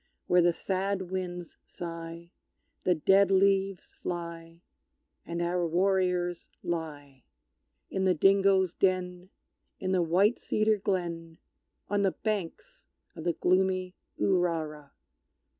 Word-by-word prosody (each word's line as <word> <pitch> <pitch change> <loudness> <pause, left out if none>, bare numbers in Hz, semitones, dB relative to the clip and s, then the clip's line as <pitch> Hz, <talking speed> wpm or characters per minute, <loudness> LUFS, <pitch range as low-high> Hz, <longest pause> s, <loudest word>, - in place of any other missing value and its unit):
Where 180 0 +4
the 175 0 +4
sad 190 +1 -2
winds 180 -2 -5
sigh 170 0 -8 0.5
The 180 - +4
dead 195 +5 +4
leaves 195 -1 +2
fly, 170 -1 -6 0.6
And 170 0 -2
our 175 +1 0
warriors 180 0 0
lie; 145 -6 -5 0.7
In 190 0 0
the 185 -1 +3
dingoes' 195 +1 +4
den 180 -1 -1 0.5
in 185 -1 -2
the 185 -1 +3
white 185 +7 +3
cedar 215 0 +1
glen 170 -4 -3 0.5
On 205 0 0
the 195 -2 +2
banks 215 - -4 0.3
of 160 - -8
the 170 - +2
gloomy 185 0 +1 0.3
Urara! 160 -6 0
180 Hz, 110 wpm, -29 LUFS, 170-190 Hz, 0.7 s, Where